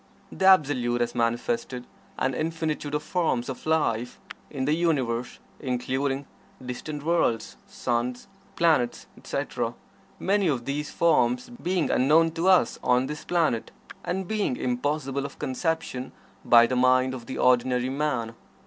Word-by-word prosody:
The 190 - -2
Absolute 135 -9 +4
has 120 0 0
manifested 125 - -1 0.3
an 135 - 0
infinitude 155 -1 -2
of 150 - -2
forms 160 -9 0
of 130 - -7
life 125 -7 0 0.3
in 135 -3 -3
the 150 - +2
Universe, 130 -8 0 0.2
including 135 +2 -2 0.4
distant 145 +4 -5
worlds, 160 -9 0
suns, 125 +4 -2 0.3
planets, 160 -8 +2
etc., - - -3 0.4
many 200 0 +1
of 130 -6 -1
these 145 +2 -3
forms 245 +9 +2
being 185 -8 -1
unknown 155 +5 +4
to 165 +3 -1
us 185 -1 +4
on 125 +1 +3
this 150 +2 -6
planet, 160 -10 0 0.3
and 190 +1 -3
being 210 -11 -1
impossible 135 +2 -1
of 140 - -7
conception 135 -2 -3 0.3
by 120 -1 +7
the 130 - -1
mind 130 +1 +3
of 125 -2 -8
the 130 - -5
ordinary 125 0 +2
man. 130 -5 -1
140 Hz, 135 wpm, -26 LUFS, 125-165 Hz, 0.4 s, by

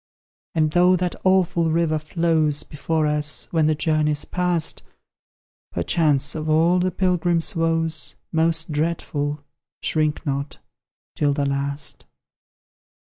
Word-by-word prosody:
And 155 -1 +2
though 180 +2 +5
that 180 -1 -1
awful 180 -3 +3
river 160 -1 +1
flows 155 -2 0
Before 155 +2 -1
us, 150 -3 -1
when 160 -2 +2
the 155 - +2
journey's 150 -1 0
past, 180 -3 -1 0.9
Perchance 145 - +1
of 155 0 -4
all 165 +4 +4
the 185 +1 +1
pilgrim's 175 -2 0
woes 165 -1 0 0.2
Most 160 0 +1
dreadful 150 -2 -2 0.4
shrink 155 0 0
not 140 0 -3 0.6
'tis 145 -1 +1
the 140 -1 0
last! 140 +1 -2
155 Hz, 115 wpm, -22 LUFS, 150-170 Hz, 0.9 s, though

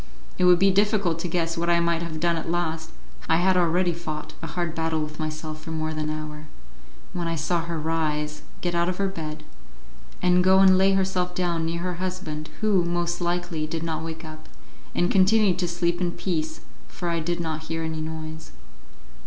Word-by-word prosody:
It 180 - +4
would 180 -1 +7
be 195 +2 +5
difficult 200 -4 +2
to 180 - -2
guess 165 -1 0
what 170 +1 -1
I 170 0 +5
might 170 -1 +1
have 165 -2 -4
done 170 +1 +2
at 165 - -3
last 165 -2 -1 0.4
(I - - +5
had 185 +3 +3
already 175 0 +3
fought 155 -2 -5
a 165 - -4
hard 170 +1 -2
battle 160 -1 0
with 155 0 -7
myself 155 0 -4
for 160 - -8
more 155 0 -2
than 155 0 -2
an 155 0 -2
hour), 155 0 -7 0.7
when 175 -1 -2
I 165 - 0
saw 165 +2 0
her 170 -1 -3
rise, 150 -1 -1 0.2
get 175 -1 -1
out 170 +1 +2
of 180 - -2
her 200 - +1
bed, 155 -5 -5 0.8
and 180 0 +4
go 190 +1 +6
and 190 -1 +7
lay 190 +1 +5
herself 185 -2 0
down 170 -3 0
near 170 +1 -2
her 180 0 -1
husband, 180 -5 -4
who, 205 -4 +3
most 175 0 -1
likely, 175 -2 -1
did 160 +1 -3
not 160 -1 -2
wake 165 0 -6
up, 155 0 -10 0.5
and 175 - +2
continued 195 -1 +4
to 180 - +1
sleep 175 +1 0
in 175 -1 0
peace, 155 -4 -2 0.3
for 175 - -5
I 170 -1 +1
did 175 +2 -1
not 160 -2 -3
hear 165 0 -2
any 160 -1 -3
noise. 160 0 -6
170 Hz, 205 wpm, -25 LUFS, 160-180 Hz, 0.8 s, would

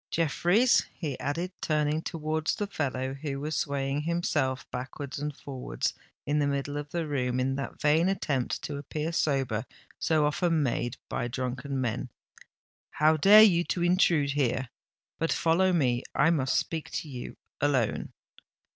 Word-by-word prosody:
Jeffreys," 175 - +3
he 150 -7 -4
added, 170 +6 -2
turning 150 0 +1
towards 155 -1 -2
the 205 - -2
fellow 135 -8 -2
who 140 0 -4
was 150 +2 -3
swaying 140 0 -1
himself 150 -5 0
backwards 130 +3 -5
and 150 -1 -4
forwards, 125 - -3 0.3
in 150 +1 +1
the 145 - +2
middle 140 0 -2
of 145 0 -4
the 170 +1 -2
room, 125 -4 -1
in 130 +1 +1
that 140 0 -5
vain 160 +4 +3
attempt 140 -9 -1
to 145 - -4
appear 150 +3 -3
sober 135 -9 0 0.4
so 155 -2 +2
often 160 +1 +1
made 120 -1 -1
by - - -2
drunken 130 +2 -3
men, 125 0 -2 0.8
"how 155 +2 +3
dare 205 +8 +8
you 175 -5 +5
to 175 0 -2
intrude 175 -5 +3
here? 130 -2 0 0.5
But 165 - 0
follow 180 +3 +3
me—I 135 0 +2
must 135 -6 +1
speak 160 -2 -2
to - - -3
you 125 -4 -7 0.2
alone." 135 -6 +1
145 Hz, 150 wpm, -28 LUFS, 135-165 Hz, 0.8 s, dare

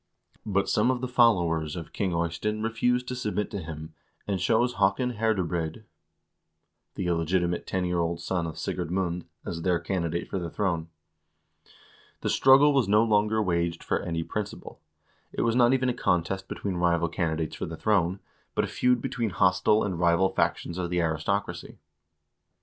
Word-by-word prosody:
But 100 -1 +1
some 105 +4 +2
of 130 -1 +1
the 130 - -2
followers 85 - +2
of 85 -2 -8
King 95 -3 -1
Eystein 85 +6 -1
refused 125 +2 0
to 125 - -3
submit 105 -4 -2
to 100 -3 -4
him, 80 -1 -8 0.3
and 100 -2 -1
chose 115 +7 +2
Haakon 100 +5 +1
Herde 110 -5 +1
breid, 85 +4 -3 1.1
the 95 - -3
illegitimate 85 +1 0
ten 95 -1 -1
year 90 -1 0
old 85 0 -1
son 85 0 -2
of 80 - -7
Sigurd - - -3
Mund, 90 -1 -2 0.2
as 85 -1 -4
their 90 0 +1
candidate 85 -1 -2
for 95 - -3
the 85 -1 -4
throne.1 85 -4 -1 1.3
The - - -1
struggle 140 +2 +6
was 135 -6 +2
no 105 +2 +5
longer 110 0 +2
waged 85 -2 -1
for - - 0
any 85 -1 -3
principle. 105 -5 -6 0.5
It - - -2
was 115 0 +1
not 120 -1 +5
even 130 -1 +2
a 125 - +1
contest 95 -3 0
between 95 -3 -4
rival 85 -1 +2
candidates 80 -2 -2
for - - -4
the 80 0 -7
throne, 95 -2 +1 0.3
but - - +2
a - - -1
feud 125 -1 +1
between 115 -3 -1
hostile 95 +3 +3
and 95 -4 -2
rival 85 +2 +3
factions 85 -2 -1
of 90 -1 -2
the 90 0 0
aristocracy. 85 +5 -2
95 Hz, 170 wpm, -27 LUFS, 85-110 Hz, 1.3 s, struggle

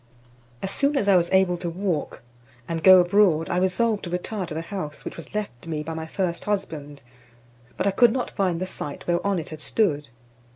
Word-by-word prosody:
As 195 - -1
soon 280 +5 +2
as 205 - 0
I 200 - +6
was 175 -1 +3
able 190 -2 +3
to 175 0 -4
walk, 170 - -3 0.4
and 165 -1 -3
go 185 -1 +9
abroad, 175 -3 +3
I 175 - 0
resolved 200 +4 +1
to - - -5
retire 180 +2 -3
to 160 - -6
the 160 - -3
house 165 -5 -6
which - - -5
was 165 +4 -10
left 170 -10 -4
me 155 -2 -3
by 160 +2 -5
my 160 0 -5
first 175 0 -2
husband, 155 -9 -4 0.7
but - - -1
I 200 - +3
could 235 +4 +5
not 250 +1 -2
find 185 -4 0
the 185 - -2
site 145 -5 -6
whereon 180 +3 +1
it 160 - -5
had 155 - -8
stood. 150 -11 0
180 Hz, 210 wpm, -24 LUFS, 160-200 Hz, 0.7 s, go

